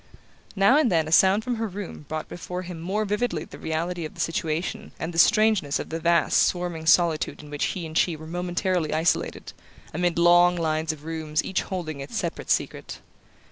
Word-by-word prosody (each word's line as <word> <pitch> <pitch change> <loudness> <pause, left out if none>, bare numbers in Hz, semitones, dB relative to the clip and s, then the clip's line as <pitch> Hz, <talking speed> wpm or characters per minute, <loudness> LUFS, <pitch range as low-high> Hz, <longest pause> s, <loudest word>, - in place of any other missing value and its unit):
Now 200 +8 +5
and 300 -6 +3
then 160 -3 +2
a - - -5
sound 190 +5 +5
from 245 -1 -2
her 225 0 -2
room 190 -6 -8
brought 155 0 -4
before 180 +1 -6
him 175 -2 -8
more 200 +5 -1
vividly 205 -6 -1
the - - -12
reality 170 +2 -3
of 155 - -7
the - - -14
situation 165 +1 -2
and 165 +2 -4
the 165 - -1
strangeness 215 -7 +4
of - - -6
the 165 - -3
vast 170 0 +3
swarming 175 -3 -1
solitude 160 -2 +2
in 150 - -12
which 145 - -1
he 175 -3 -3
and 160 0 -8
she 170 0 +2
were 155 +1 -10
momentarily 175 -1 -1
isolated, 160 +1 -1 0.4
amid 175 +1 0
long 175 +1 +5
lines 160 -1 -1
of 155 -1 -11
rooms 160 -1 -2
each 190 - -1
holding 165 -6 -5
its 135 +1 -6
separate - - -4
secret. - - -1
170 Hz, 195 wpm, -25 LUFS, 160-185 Hz, 0.4 s, Now